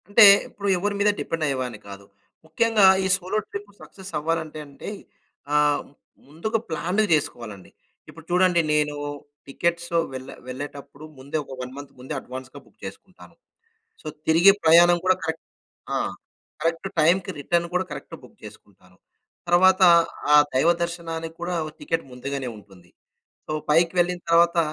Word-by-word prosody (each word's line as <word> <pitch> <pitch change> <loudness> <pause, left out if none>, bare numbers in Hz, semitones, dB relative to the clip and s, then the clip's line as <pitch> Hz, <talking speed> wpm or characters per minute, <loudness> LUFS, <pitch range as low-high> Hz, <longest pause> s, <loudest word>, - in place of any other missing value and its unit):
అంటే 210 +2 +7 0.2
ఇప్పుడు 200 0 -6
ఎవరి 205 +3 -2
మీద 205 +1 +4
డిపెండ్ 165 -1 -3
అయ్యేవాడిని 130 -5 -3
కాదు. 100 0 -10 0.4
ముఖ్యంగా 215 +5 +3 0.2
ఈ - - +2
సోలో 190 +2 -3
ట్రిప్ 200 0 -8
సక్సెస్ 190 -1 -12
అవ్వాలంటే 160 0 -3
అంటే 140 +6 -9 0.6
ఆహ్, 150 -1 +3 0.4
ముందుగా 195 +10 -2
ప్లాన్డ్‌గా 180 +7 0
చేసుకోవాలండి. 115 -9 -5 0.4
ఇప్పుడు 165 -1 -13
చూడండి 180 -1 +4
నేను 150 -1 +1 0.5
టికెట్స్ 170 +4 -2 0.2
వెళ్ళే 130 0 -8
వెళ్ళేటప్పుడు 140 +2 -8 0.2
ముందే 140 +4 -4
ఒక 135 - -11
1 125 0 -6
మంత్ 145 -1 -9
ముందే 130 - -7
అడ్వాన్స్‌గా 130 +1 -9
బుక్ - - -27
చేసుకుంటాను. - - -12 0.7
సో, - - -16 0.2
తిరిగి 170 +5 +6
ప్రయాణం 175 +2 +6
కూడా 185 0 +3
కరెక్ట్ 160 0 -4 0.5
ఆ! - - +1 0.6
కరెక్ట్ 165 +3 -1
టైమ్‌కి 175 +4 +2
రిటర్న్ 170 +4 0
కూడా 185 +1 0
కరెక్ట్ 145 - -8
బుక్ - - -16
చేసుకుంటాను. 90 -2 -15 0.5
తర్వాత 185 +2 +5 0.5
ఆహ్, 150 0 +8
దైవ 135 +6 +4
దర్శనానికి 165 -1 -5
కూడా 175 +1 -2 0.2
టికెట్ 165 - -2
ముందుగానే 130 +1 -5
ఉంటుంది. 95 -4 -18 0.6
సో, - - -4 0.2
పైకి 165 +2 +4
వెళ్ళిన 175 0 0
తరువాత 170 +1 +4
165 Hz, 140 wpm, -24 LUFS, 140-175 Hz, 0.7 s, ఆహ్